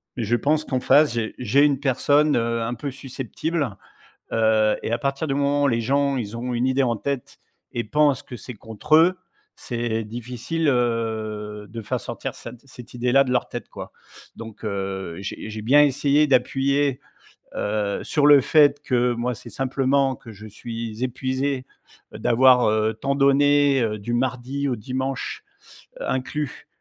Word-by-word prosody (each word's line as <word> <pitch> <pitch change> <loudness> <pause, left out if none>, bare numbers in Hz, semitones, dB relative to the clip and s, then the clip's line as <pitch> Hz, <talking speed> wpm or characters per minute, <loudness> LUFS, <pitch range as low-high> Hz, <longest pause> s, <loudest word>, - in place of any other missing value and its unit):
mais 120 - -3
je 115 +3 +1
pense 155 +3 +1
qu'en 130 -4 -2
face, 145 +2 +4
j'ai 115 -2 -3
j'ai 130 +5 +3
une 140 -3 +1
personne, 145 +2 +2
heu, 115 0 0
un 115 +1 -2
peu 130 +4 -5
susceptible, 135 0 -4 0.6
heu 110 -1 +3
et - - -3
à 115 - +1
partir 140 +4 -2
du 135 - -1
moment 145 0 +1
où - - +4
les 115 -2 0
gens 140 +3 +1
ils 110 -2 -4
ont 125 +1 -4
une 120 +2 0
idée 130 +1 +2
en 120 -2 0
tête 140 +1 -4 0.3
et 120 - -3
pensent 145 +3 +2
que 125 - -9
c'est 125 +4 -9
contre 115 +9 0
eux, 175 +3 +4 0.4
c'est 115 -2 -3
difficile 125 +8 -4
heu 110 -4 -2
de 115 +1 -7
faire - - -3
sortir - - -6
cette 125 - -10
cette 125 -3 -13
idée 125 0 -1
là 135 +2 +6
de 125 - -3
leur 125 - +1
tête, - - -6
quoi. - - -9 0.5
Donc 115 -1 -10
heu, 95 -4 -4
j'ai 100 +2 -6
j'ai 110 0 -6
bien 135 +7 +5
essayé 145 +2 +3
d'appuyer, 135 +1 +1 0.6
heu, 105 -1 -2
sur 145 -2 +1
le 145 -2 +8
fait 145 +1 +4
que 125 -2 +1
moi, 120 +1 -2
c'est - - -11
simplement 135 0 +1
que 115 - -13
je 105 +1 -12
suis 115 +2 -6
épuisé 130 +1 -2 0.5
d'avoir, 125 +1 +4
heu, 110 +1 +1
tant 140 +5 -1
donné, 140 0 +4
heu, 110 -2 -1
du 120 +4 -4
mardi 130 +3 -1
au 130 - 0
dimanche, 130 +4 -4 0.6
heu, - - -4
inclus 135 +2 -3
125 Hz, 175 wpm, -23 LUFS, 115-140 Hz, 0.6 s, le